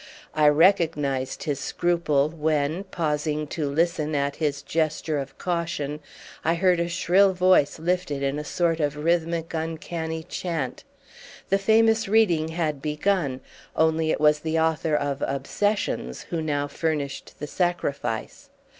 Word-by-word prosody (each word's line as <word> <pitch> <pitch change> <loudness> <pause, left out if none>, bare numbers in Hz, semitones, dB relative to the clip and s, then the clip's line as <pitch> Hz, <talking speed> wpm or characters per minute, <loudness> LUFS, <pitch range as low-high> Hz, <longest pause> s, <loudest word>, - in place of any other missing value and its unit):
I 155 -1 +4
recognised 150 -4 +2
his 145 -5 -2
scruple 155 -3 +1
when, 155 +2 -1
pausing 150 -3 -1
to 150 -4 -2
listen 155 0 0
at 140 0 -1
his 145 -3 -1
gesture 155 -1 -1
of 135 0 -7
caution, 170 -4 -2 0.4
I 165 +2 +2
heard 180 0 +3
a 170 0 0
shrill 190 +3 +3
voice 180 -5 +3
lifted 165 -4 -1
in 140 +2 -1
a - - -4
sort 165 +1 0
of 145 -2 0
rhythmic 165 +1 0
uncanny 160 0 -4
chant. 165 -6 -4 0.7
The 195 - +3
famous 220 +2 +3
reading 190 -7 +3
had 160 -4 -2
begun, 150 -2 0 0.3
only 160 0 +2
it - - +1
was 150 0 +4
the 160 +1 -1
author 160 -1 +1
of 140 -1 -1
"Obsessions" 140 - -1
who 165 -2 -1
now 145 -2 -1
furnished 145 -2 -3
the 150 - -5
sacrifice. 175 - -2
160 Hz, 135 wpm, -25 LUFS, 150-175 Hz, 0.7 s, I